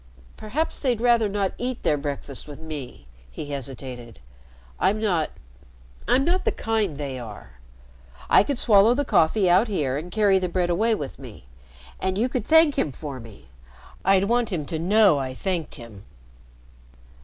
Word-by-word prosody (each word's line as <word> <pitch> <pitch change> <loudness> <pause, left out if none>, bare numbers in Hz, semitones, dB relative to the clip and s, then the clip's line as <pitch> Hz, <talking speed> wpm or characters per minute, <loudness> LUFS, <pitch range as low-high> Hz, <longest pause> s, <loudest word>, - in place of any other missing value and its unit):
"Perhaps 280 +10 -3
they'd 250 -5 0
rather 235 -3 +3
not 200 -1 -1
eat 250 0 -3
their 150 - +2
breakfast 140 -1 -5
with 145 -1 -10
me," 155 -5 -8 0.2
he 145 - -8
hesitated. 130 -4 -7 0.6
"I'm 210 +2 +2
not 180 -8 0 0.8
I'm 270 +2 +3
not 365 +2 +1
the - - +1
kind 215 -9 -1
they 140 -3 -5
are. 105 - -11 0.7
I - - +6
could 275 +6 -2
swallow 220 0 +5
the 285 +2 0
coffee 190 -2 +3
out 180 +7 +4
here 145 -10 -1
and 170 +4 -8
carry 205 -2 +3
the 180 -1 -2
bread 175 0 0
away 220 +6 +2
with 140 -8 -7
me. 120 - -12 0.5
And 190 0 -1
you 240 +5 +1
could 250 - -3
thank 320 -3 +5
him 150 - 0
for 140 -1 -7
me. 110 - -14 0.5
I'd 195 0 +4
want 235 +2 +1
him 160 -6 -2
to 160 +2 -4
know 190 -2 +4
I 130 -1 -4
thanked 180 0 -3
him." 115 -6 -12
180 Hz, 165 wpm, -24 LUFS, 140-220 Hz, 0.8 s, I